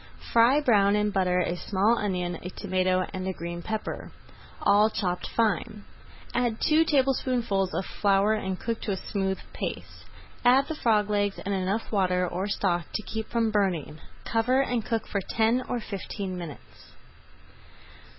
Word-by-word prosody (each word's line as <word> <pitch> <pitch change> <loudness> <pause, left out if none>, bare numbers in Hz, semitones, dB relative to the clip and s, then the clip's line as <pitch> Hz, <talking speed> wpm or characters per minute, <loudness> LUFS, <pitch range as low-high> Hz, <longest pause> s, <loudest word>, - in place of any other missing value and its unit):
Fry 235 +5 +6
brown 205 -8 +4
in 210 0 +1
butter 180 -2 +2
a 175 - -1
small 200 +5 +2
onion, 180 -4 -2
a 180 - -6
tomato, 185 -1 0
and 185 -1 -4
a 190 - -1
green 170 0 -6
pepper, 220 +3 -4 0.5
all 210 +2 +5
chopped 180 -4 -2
fine. 215 -2 0 0.5
Add 240 -2 0
two 315 +1 +4
tablespoonfuls 255 - +1
of 190 - -1
flour 200 +1 +2
and 190 -3 -2
cook 230 -1 -3
to 205 - -2
a - - -3
smooth 190 -1 -2 0.2
paste. - - -6 0.4
Add 255 +3 +5
the 315 - -3
frog 215 -7 +1
legs 205 -1 +1
and 200 - -1
enough 195 +3 -1
water 180 -3 +2
or 185 +3 -3
stock 180 -4 0
to 215 - -2
keep 220 +1 -5
from 230 -2 +1
burning. 180 -7 0 0.3
Cover 245 +4 +2
and 245 -4 -1
cook 225 0 -2
for 200 - -1
ten 225 +5 +1
or 245 - -1
fifteen 200 -2 -5
minutes. 170 -5 -10
205 Hz, 160 wpm, -27 LUFS, 185-230 Hz, 0.5 s, Fry